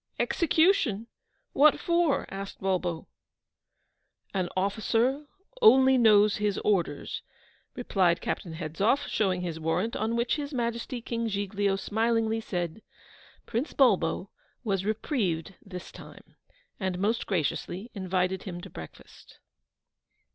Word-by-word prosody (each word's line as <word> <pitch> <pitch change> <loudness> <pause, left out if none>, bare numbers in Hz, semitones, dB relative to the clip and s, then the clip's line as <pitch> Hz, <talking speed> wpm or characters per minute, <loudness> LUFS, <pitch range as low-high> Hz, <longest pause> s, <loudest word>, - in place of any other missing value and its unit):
'Execution! 320 - +2 0.5
what 290 +2 +5
for?' 340 -4 +1
asked 195 0 -6
Bulbo. 180 -3 -1 1.3
'An 185 -3 -1
officer 225 +8 +1 0.3
only 265 - +7
knows 215 -4 +5
his 210 -2 0
orders,' 175 -8 0 0.5
replied 185 -8 +2
Captain 170 -6 -4
Hedzoff, 185 - 0
showing 185 -4 0
his 170 -3 -4
warrant, 180 +8 -1
on 220 +2 -1
which 235 +5 +1
His 285 -1 -5
Majesty 235 0 -2
King 230 0 -2
Giglio 200 -1 0
smilingly 225 +2 0
said, 175 -1 -4 0.6
'Prince 245 +6 -2
Bulbo 190 - +2 0.3
was 195 -4 -1
reprieved 205 - -1
this 180 -2 -9
time,' - - -14 0.4
and 190 -3 -2
most 215 +5 0
graciously 190 - -2
invited 185 -2 -1
him 175 -3 -6
to - - -10
breakfast. 80 -1 -12
205 Hz, 110 wpm, -28 LUFS, 185-235 Hz, 1.3 s, only